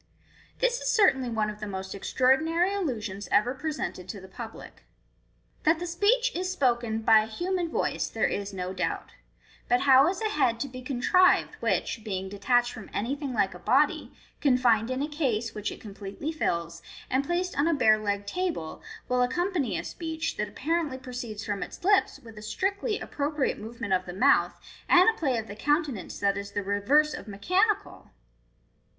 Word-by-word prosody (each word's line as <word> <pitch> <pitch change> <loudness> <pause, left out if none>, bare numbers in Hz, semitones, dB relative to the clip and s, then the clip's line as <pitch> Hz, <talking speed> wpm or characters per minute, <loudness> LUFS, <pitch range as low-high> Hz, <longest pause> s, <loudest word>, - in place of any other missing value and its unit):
" - - -29
This - - +2
is - - -1
certainly 270 - +3
one 215 -2 0
of 210 - -12
the 210 - -5
most 190 -1 -5
extraordinary 315 - +2
illusions 215 - -3
ever 240 +5 +3
presented 290 - -4
to 205 - -5
the 190 - -12
public. 225 +4 -10 0.8
That 320 +2 +3
the 350 - -4
speech 425 +9 +2
is 365 +1 -1
spoken 240 -8 0
by 220 0 +7
a 215 - -1
human 350 +8 -2
voice - - -1
there - - -1
is 200 0 -2
no 185 -1 -4
doubt 185 - -3
• - - -21 0.6
but 245 +1 +3
how 270 +1 +6
is 375 - -3
a 440 -1 -1
head 250 - +1
to 280 - -1
be 255 -1 -9
contrived 280 +9 +3
which, 225 - -1
being 190 -3 -4
detached 240 +4 +1
from 220 - -10
anything 275 +6 -2
like 245 - +1
a - - -10
body, - - +2 0.3
confined 250 -5 +3
in 260 +2 -1
a - - -1
case, 255 -7 -1
which 210 -1 -3
it - - -9
completely 200 +7 -6
fills, 170 - -2 0.3
and 265 +2 +1
placed 350 +4 -1
on 285 +3 +2
a 335 - +3
bare 215 -6 +4
legged 200 -1 -2
table, 340 - -3 0.3
will 250 0 +1
accompany 275 - 0
a - - -3
speech, 320 -2 -4
that 210 - -1
apparently 305 +4 -1
proceeds 245 -5 -6
from 205 -2 -3
its - - -7
lips, 400 -4 +3
with 225 -4 -12
a - - -11
strictly 390 - -1
appro 285 +1 -3
priate 295 -3 -1
movement 220 -2 -4
of 185 0 0
the 180 - -5
mouth, 265 +10 +3 0.3
and 360 +2 +7
a 445 0 +3
play 265 -6 +1
of 220 - -3
the 205 - -8
countenance 290 - -1
that 200 0 +1
is 200 0 -8
the 205 - -2
reverse 255 +11 +2
of - - -8
mechanical? 380 - 0
250 Hz, 190 wpm, -27 LUFS, 210-325 Hz, 0.8 s, by